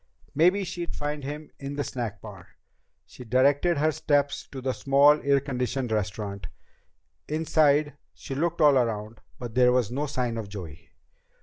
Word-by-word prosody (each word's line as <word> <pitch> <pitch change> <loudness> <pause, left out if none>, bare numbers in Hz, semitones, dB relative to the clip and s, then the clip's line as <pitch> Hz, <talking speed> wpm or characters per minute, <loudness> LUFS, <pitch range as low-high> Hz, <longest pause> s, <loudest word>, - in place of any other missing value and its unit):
Maybe 180 +6 +3
she'd 175 -2 -5
find 145 0 -4
him 150 +3 -7
in 140 +1 -6
the 145 - -1
snack 115 -7 -5
bar. 95 -4 -12 0.5
She - - -12
directed 140 +8 +2
her 155 +2 +2
steps 145 -1 0
to 135 - -8
the 130 0 -2
small 140 +3 +4
air 140 0 +3
conditioned 125 -2 -3
restaurant. 100 -2 -3 0.8
Inside, 150 -2 +2 0.2
she - - -8
looked 165 +4 -1
all 145 -3 +6
around, 110 -2 -3 0.2
but 120 -2 -7
there 125 0 +5
was 125 -4 +1
no 145 +4 -2
sign 125 -5 -2
of 105 -3 -6
Joey. 85 -6 -9
135 Hz, 160 wpm, -26 LUFS, 115-150 Hz, 0.8 s, all